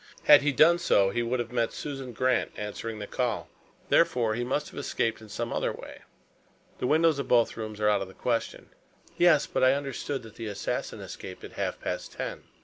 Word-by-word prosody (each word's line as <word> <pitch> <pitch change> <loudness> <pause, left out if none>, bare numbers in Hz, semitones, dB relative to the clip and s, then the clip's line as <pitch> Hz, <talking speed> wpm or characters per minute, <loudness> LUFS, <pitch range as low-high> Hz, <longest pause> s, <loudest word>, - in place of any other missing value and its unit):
Had 145 -1 +8
he 145 0 +2
done 165 +5 +5
so, 100 - +3
he 120 - 0
would 120 +2 -1
have 120 -1 -3
met 120 -2 0
Susan 135 -3 -6
Grant 130 +1 +1
answering 105 +2 -5
the 105 - -5
call. 120 -1 -2 0.4
Therefore, 115 -3 +3
he 120 +2 -2
must 145 +4 -2
have - - -7
escaped 115 -5 -1
in 110 - -13
some 115 +3 -3
other - - 0
way. - - -10 0.8
The - - 0
windows 160 0 +3
of 140 - -3
both 120 -2 +3
rooms 110 -1 -6
are 105 - +2
out 105 -2 +3
of 95 - -4
the 95 - -14
question." 115 -2 -2 0.5
"Yes. 170 -4 +5
But - - -1
I 130 +1 +6
understood 140 -1 -4
that 110 -2 -13
the 115 - -5
assassin 100 -1 -3
escaped - - -9
at - - -8
half - - -3
past - - -4
ten." - - -5
120 Hz, 210 wpm, -28 LUFS, 110-140 Hz, 0.8 s, Had